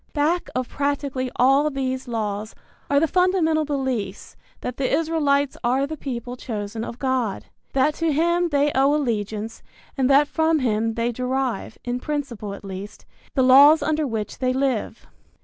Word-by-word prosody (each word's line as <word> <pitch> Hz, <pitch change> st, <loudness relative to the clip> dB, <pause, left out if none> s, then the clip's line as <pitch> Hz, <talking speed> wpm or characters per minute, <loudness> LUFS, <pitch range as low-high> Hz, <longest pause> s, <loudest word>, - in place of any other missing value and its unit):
Back 320 Hz, +4 st, 0 dB
of 255 Hz, -1 st, -1 dB
practically 280 Hz, -2 st, -2 dB
all 270 Hz, +4 st, +4 dB
these 260 Hz, -2 st, -3 dB
laws 215 Hz, -2 st, -3 dB, 0.3 s
are 280 Hz, -, +4 dB
the 325 Hz, -, +2 dB
fundamental 355 Hz, -3 st, +2 dB
beliefs 260 Hz, -9 st, -3 dB, 0.3 s
that 250 Hz, -, -5 dB
the 270 Hz, -, -1 dB
Israelites 290 Hz, -3 st, +1 dB
are 255 Hz, +3 st, +2 dB
the 315 Hz, +2 st, -5 dB
people 245 Hz, -4 st, -5 dB
chosen 220 Hz, -2 st, -5 dB
of 235 Hz, -, -6 dB
God, 255 Hz, -6 st, -1 dB, 0.3 s
that 275 Hz, +3 st, +3 dB
to 330 Hz, -1 st, +2 dB
him 340 Hz, +3 st, +2 dB
they 290 Hz, -1 st, +2 dB
owe 275 Hz, +2 st, +3 dB
allegiance 220 Hz, -5 st, -2 dB, 0.3 s
and 265 Hz, -1 st, +1 dB
that 280 Hz, +1 st, +5 dB
from 320 Hz, +1 st, +2 dB
him 225 Hz, -4 st, 0 dB
they 235 Hz, +1 st, 0 dB
derive, 255 Hz, -1 st, -2 dB
in 245 Hz, 0 st, -2 dB
principle 250 Hz, -8 st, -4 dB
at 200 Hz, -, -12 dB
least, 195 Hz, +1 st, -8 dB, 0.3 s
the 265 Hz, -, +3 dB
laws 280 Hz, +5 st, +7 dB
under 310 Hz, -1 st, 0 dB
which 220 Hz, -3 st, -4 dB
they 255 Hz, -1 st, +1 dB
live. 265 Hz, -4 st, -1 dB
265 Hz, 160 wpm, -23 LUFS, 235-295 Hz, 0.3 s, laws